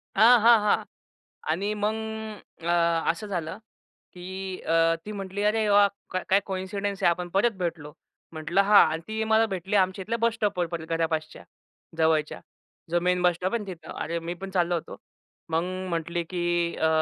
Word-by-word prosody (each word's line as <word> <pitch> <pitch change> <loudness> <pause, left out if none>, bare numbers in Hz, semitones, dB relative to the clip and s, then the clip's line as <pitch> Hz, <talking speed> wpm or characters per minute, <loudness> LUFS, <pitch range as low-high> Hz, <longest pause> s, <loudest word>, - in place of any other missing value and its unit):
आहाहा! 225 -1 +6 0.7
आणि 195 +6 0
मग 210 +1 0 0.7
अ, - - -7 0.4
असं 170 +6 -3
झालं, 175 -2 -4 0.5
की 190 +1 -6
अ, 165 0 +3
ती 210 - -6
म्हटली 195 0 -5
"अरे 215 0 +2
वा! 205 0 +6 0.2
का 185 - -2
काय 195 +1 +4
कॉइन्सिडन्स 195 +1 -3
आहे, 175 - +5
आपण 175 +1 -3
परत 230 +4 +3
भेटलो." 165 -4 -4 0.4
म्हटलं 165 +5 +1
"हां." 205 +1 +7
आणि 160 - -4
ती 220 0 -2
मला 220 +1 +3
भेटली 195 0 -2
आमच्या 190 0 +1
इथल्या 230 +5 -2
बस 230 0 +2
स्टॉपवर 200 -6 0
परत, 165 -1 -6
घरापासच्या 160 -1 -2 0.6
जवळच्या. 160 -1 +1 0.5
जो 175 +1 +2
मेन 180 0 +1
बस 175 -1 +4
स्टॉप 185 +5 -2
आहे 210 -3 -2
तिथं. 175 -4 -8
अरे 170 +1 -3
मी 170 +1 -5
पण 195 +2 -8
चाललो 175 -2 +1
होतो. 165 - -5 0.5
मग 160 +1 +1 0.3
म्हटली 170 0 -2
की 175 -1 0
अ, 160 - +1
185 Hz, 165 wpm, -26 LUFS, 170-205 Hz, 0.7 s, हां